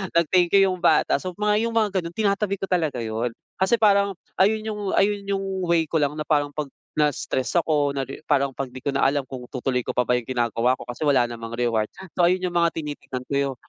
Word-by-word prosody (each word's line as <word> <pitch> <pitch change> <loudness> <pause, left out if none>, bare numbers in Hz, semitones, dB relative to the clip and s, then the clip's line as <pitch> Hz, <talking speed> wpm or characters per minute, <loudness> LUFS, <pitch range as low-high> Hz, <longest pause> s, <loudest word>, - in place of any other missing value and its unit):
nag-thank 175 +2 +4
you, 195 -1 +5
yung 185 - -4
bata. 175 - +3
So, 185 -1 -6
mga 210 +2 +1
yung 230 - -5
mga 210 -4 +2
ganon 170 -1 -7
tinatabi 200 -1 +1
ko 195 0 -6
talaga 155 -9 0
yun. 115 +1 -3 0.2
Kasi 190 +5 +3
parang 200 -3 +3 0.2
ayun 215 +3 +3
yung 205 -2 -3
ayun 200 0 +1
yung 195 -1 -1 0.2
way 170 -1 +3
ko 160 +1 -1
lang 145 0 0
na 155 - -3
parang 145 -2 +1
'pag 150 -3 -4 0.2
na-stress 150 0 0
ako 150 -4 +1
na 135 -2 -3
ri 135 - -9
parang 140 -3 +1
'pag 135 -2 -4
di 130 - -8
ko 140 +2 -3
na 140 - +2
alam 140 -1 +1
kung 130 -1 -7
'tutuloy 125 -1 -1
ko - - -3
pa 125 - 0
ba 125 - +3
yung 125 - -1
ginagawa 120 0 +1
ko - - -10
kasi 120 +5 -5
wala 135 -5 +3
namang 115 -1 -7
reward. 115 -3 0 0.2
So 175 - +2
ayun 180 +2 +3
yung 175 - -6
mga 170 -1 +3
tinitignan 145 -4 -6
ko. 140 -1 0
150 Hz, 230 wpm, -24 LUFS, 130-190 Hz, 0.2 s, you